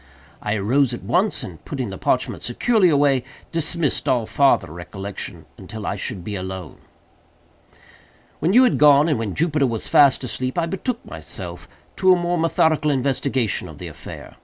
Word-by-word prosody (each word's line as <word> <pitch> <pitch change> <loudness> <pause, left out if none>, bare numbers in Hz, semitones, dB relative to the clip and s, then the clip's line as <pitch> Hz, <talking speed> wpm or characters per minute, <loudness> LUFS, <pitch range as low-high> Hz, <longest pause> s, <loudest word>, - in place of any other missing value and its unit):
I 105 +1 -1
arose 120 +5 +2
at - - -11
once, 180 - +1
and - - -9
putting 130 -9 -4
the 95 - -6
parchment - - 0
securely 195 - +2
away, 140 -4 +3 0.3
dismissed 165 -2 -1
all 120 -3 +2
farther 110 - +2
reflection 95 +3 -7
until 110 -2 -8
I - - -2
should 95 -1 -5
be 105 - -5
alone. 95 -3 -6 1.6
"When 165 +4 +1
you 250 +5 +7
had 250 - +2
gone, 145 0 +6
and 150 -7 +1
when 110 -4 -3
Jupiter 150 -4 +1
was 115 -3 -4
fast 140 -2 +5
asleep, 130 +2 -3
I 170 - +2
betook 225 +8 -4
myself - - -8 0.3
to 185 -1 +5
a 180 - +1
more 175 0 0
methodical 160 -2 +2
investigation 135 -4 0
of - - -11
the - - -7
affair. - - -11
140 Hz, 165 wpm, -22 LUFS, 110-165 Hz, 1.6 s, you